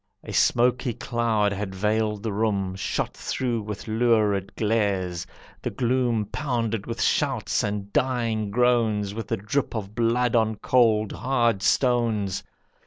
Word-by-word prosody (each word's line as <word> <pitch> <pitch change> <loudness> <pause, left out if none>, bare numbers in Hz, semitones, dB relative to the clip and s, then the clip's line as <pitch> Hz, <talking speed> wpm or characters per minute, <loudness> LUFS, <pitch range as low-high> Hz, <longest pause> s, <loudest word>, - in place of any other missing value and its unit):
A - - -7
smoky 125 0 +2
cloud 115 -4 0
had 100 -1 -4
veiled 105 +1 0
the 110 - -2
room, 100 -3 0
Shot 95 - -2
through 120 -4 -2
with 105 0 -7
lurid 110 -4 +1
glares; 95 -5 0 0.3
the - - -2
gloom 120 -3 0
Pounded 115 -3 -2
with 115 0 -5
shouts - - +1
and 100 -1 -3
dying 115 -5 0
groans, 110 -3 +2
With 110 -1 -5
the - - -1
drip 115 +7 -2
of 105 -2 -5
blood 120 +1 +1
on 110 -1 +2
cold, 110 -2 +2
hard 120 -4 +1
stones. 115 -6 +1
110 Hz, 135 wpm, -25 LUFS, 105-120 Hz, 0.3 s, smoky